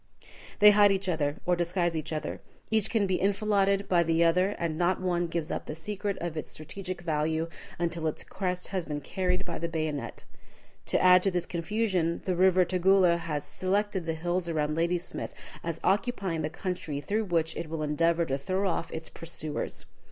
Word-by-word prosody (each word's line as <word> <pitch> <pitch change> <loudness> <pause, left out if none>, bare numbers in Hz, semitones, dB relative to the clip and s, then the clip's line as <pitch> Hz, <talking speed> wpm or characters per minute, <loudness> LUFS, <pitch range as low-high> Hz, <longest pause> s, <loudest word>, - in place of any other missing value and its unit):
They 210 -1 +9
hide 205 -1 +6
each 195 0 0
other, 150 -4 0
or 180 - +3
disguise 175 0 0
each 155 0 -3
other. 155 -1 -4 0.3
Each 220 -1 +3
can 220 -4 +2
be 185 -1 0
enfiladed 200 0 +2
by 175 -2 +4
the 165 0 +3
other, 180 +4 +3
and 165 -2 -2
not 175 +3 +1
one 175 -2 0
gives 165 -2 -3
up - - -4
the 155 - -4
secret 200 +3 -3
of 170 -2 -4
its 155 - -5
strategic 185 +3 -6
value 160 0 0 0.3
until 170 -1 -1
its 155 - -3
crest 180 -2 -3
has 185 -3 -2
been 145 -1 -3
carried 180 +4 -1
by 170 - -4
the 170 - -1
bayonet. 155 -3 -3 0.6
To - - +3
add 180 0 +7
to 195 - +2
this 175 -2 -1
confusion, 180 -1 -1
the 185 - 0
river 185 0 +5
Tugela 185 -1 +4
has 150 -3 -3
selected 190 -1 -1
the 165 - 0
hills 175 +2 -1
around 150 -2 0
Ladysmith 170 +2 -2 0.3
as 165 -1 -3
occupying 195 -5 0
the 150 - -1
country 175 -3 -4
through 215 +8 -1
which 165 -3 0
it 165 -2 -5
will 160 -1 -3
endeavor 165 +3 +2
to 135 -3 -2
throw 185 +7 0
off 170 -2 -2
its 160 0 -5
pursuers. 160 -2 -5
175 Hz, 190 wpm, -29 LUFS, 160-190 Hz, 0.6 s, They